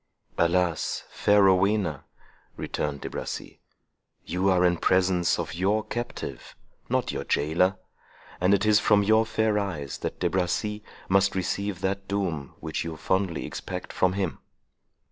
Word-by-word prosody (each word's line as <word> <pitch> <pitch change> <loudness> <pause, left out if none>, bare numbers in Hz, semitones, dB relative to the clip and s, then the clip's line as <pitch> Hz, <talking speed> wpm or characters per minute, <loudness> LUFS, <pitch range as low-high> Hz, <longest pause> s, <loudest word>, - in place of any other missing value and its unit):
"Alas! 85 -1 +1
fair 105 -1 +4
Rowena," 95 -5 +2 0.5
returned 70 -1 -3
De - - -5
Bracy, - - -6 0.7
"you 95 +2 0
are 90 -1 +4
in 90 -1 +3
presence 90 -1 +2
of 95 - -4
your 100 +5 +1
captive, 120 +2 -6 0.3
not - - 0
your - - -3
jailor; 85 +6 +1 0.6
and 90 +3 +4
it 100 +1 -1
is 105 -1 +5
from 105 -1 +4
your 110 +2 +4
fair 110 -2 +1
eyes 80 -9 -4
that - - -4
De 90 - +2
Bracy 95 +4 -1 0.2
must 100 +1 +3
receive 95 0 -2
that 100 0 -2
doom 90 -9 -2
which 80 - -3
you 80 -1 -5
fondly 95 -3 -1
expect - - -6
from 95 0 +2
him." 95 -4 -2
95 Hz, 145 wpm, -26 LUFS, 85-100 Hz, 0.7 s, is